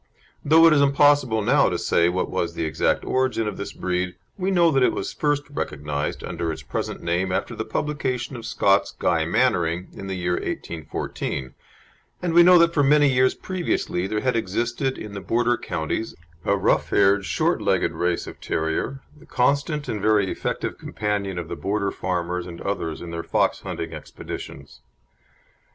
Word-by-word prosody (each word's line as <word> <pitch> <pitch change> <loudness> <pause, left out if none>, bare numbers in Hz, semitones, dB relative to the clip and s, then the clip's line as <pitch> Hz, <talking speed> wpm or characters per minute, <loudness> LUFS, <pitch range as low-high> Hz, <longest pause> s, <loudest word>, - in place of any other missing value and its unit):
Though 160 +3 +6
it 165 - +7
is 145 - +4
impossible 140 -5 +4
now - - +4
to - - -1
say 85 0 +2
what 90 +1 -1
was - - -2
the 80 - -1
exact 80 -3 0
origin 130 -4 0
of 105 - -4
this 100 - -5
breed, 90 0 -2 0.2
we 190 0 -1
know 175 -3 +4
that 135 -2 +2
it - - +4
was - - -4
first 145 -1 0
recognised 75 - -3
under 85 -1 -3
its 80 - -7
present - - -4
name 90 +2 0
after 95 +1 -2
the 110 - -4
publication 130 0 -2
of 115 -2 -7
Scott's 100 0 +2
Guy - - +1
Mannering, 85 +2 +1
in 95 - -8
the 95 - -3
year 90 0 -1
1814, 75 -6 -4 0.7
and 175 -2 -2
we 170 - +8
know 180 +1 +8
that 170 0 +4
for 150 - +3
many 145 0 +4
years 130 0 +3
previously 175 - -2
there 105 +1 -2
had 130 -2 +1
existed 120 +5 -1
in 105 -1 -8
the 100 - -5
Border 120 +3 +1
counties 85 +2 -3 0.3
a 100 - +2
rough 95 - +1
haired, 100 0 +4
short - - 0
legged - - +1
race 90 0 -1
of - - -10
terrier, 80 +12 -2
the 150 - -18
constant 140 +3 +1
and 110 -5 -3
very 105 -3 +3
effective - - -3
companion 100 -3 -2
of 85 -2 -4
the - - -5
Border 100 0 -1
farmers 90 -1 -2
and 85 -1 -9
others 85 -6 -3
in 85 - -7
their 85 0 -3
fox - - +1
hunting - - -5
expeditions. 70 0 -9
105 Hz, 180 wpm, -23 LUFS, 90-140 Hz, 0.7 s, we